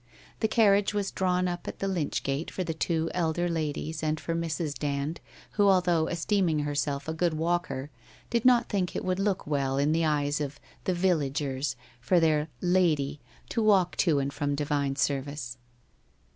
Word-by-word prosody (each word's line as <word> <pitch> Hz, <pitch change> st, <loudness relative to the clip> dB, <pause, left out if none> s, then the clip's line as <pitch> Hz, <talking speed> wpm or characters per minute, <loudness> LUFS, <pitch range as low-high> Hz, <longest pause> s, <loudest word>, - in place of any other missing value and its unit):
The 220 Hz, -, +2 dB
carriage 205 Hz, -2 st, +3 dB
was 200 Hz, -1 st, -1 dB
draw 185 Hz, -1 st, 0 dB
r -, -, +2 dB
n 180 Hz, 0 st, +1 dB
up 175 Hz, 0 st, -4 dB
at -, -, -5 dB
the 195 Hz, -, -2 dB
lych 175 Hz, -7 st, -1 dB
gate 140 Hz, +4 st, -2 dB
for 185 Hz, -, -3 dB
the 165 Hz, -, -2 dB
two 160 Hz, 0 st, -1 dB
elder 175 Hz, 0 st, 0 dB
ladies 160 Hz, -1 st, -2 dB
and 155 Hz, 0 st, 0 dB
for 155 Hz, +3 st, -3 dB
Mrs. 165 Hz, -2 st, -2 dB
Dand, 145 Hz, +2 st, -2 dB, 0.3 s
who 205 Hz, -1 st, +3 dB
although 175 Hz, -4 st, +3 dB
esteeming 170 Hz, -1 st, +1 dB
herself 145 Hz, -1 st, -2 dB
a 160 Hz, -, -1 dB
good 165 Hz, 0 st, 0 dB
walker, 155 Hz, -4 st, -1 dB, 0.4 s
did 235 Hz, -1 st, +1 dB
not 245 Hz, -2 st, +5 dB
think 190 Hz, -4 st, -1 dB
it -, -, -3 dB
would 185 Hz, 0 st, 0 dB
look 195 Hz, -1 st, 0 dB
well 140 Hz, -2 st, 0 dB
in 145 Hz, +2 st, +2 dB
the 165 Hz, +1 st, +2 dB
eyes 145 Hz, -1 st, +1 dB
of 145 Hz, 0 st, -4 dB
' -, -, -28 dB
the 185 Hz, -, +1 dB
vil 175 Hz, -1 st, +3 dB
lagers 140 Hz, -1 st, -2 dB
' 120 Hz, -, -28 dB
for 175 Hz, +8 st, +3 dB
their 155 Hz, -2 st, +2 dB
' -, -, -33 dB, 0.2 s
Lady 150 Hz, -5 st, +1 dB, 0.2 s
' -, -, -27 dB
to 230 Hz, -, 0 dB
walk 195 Hz, -5 st, +4 dB
to 160 Hz, -6 st, +3 dB
and 140 Hz, 0 st, -1 dB
from 145 Hz, 0 st, -1 dB
divine 140 Hz, -1 st, 0 dB
service. 140 Hz, -3 st, -2 dB
160 Hz, 200 wpm, -28 LUFS, 145-180 Hz, 0.4 s, not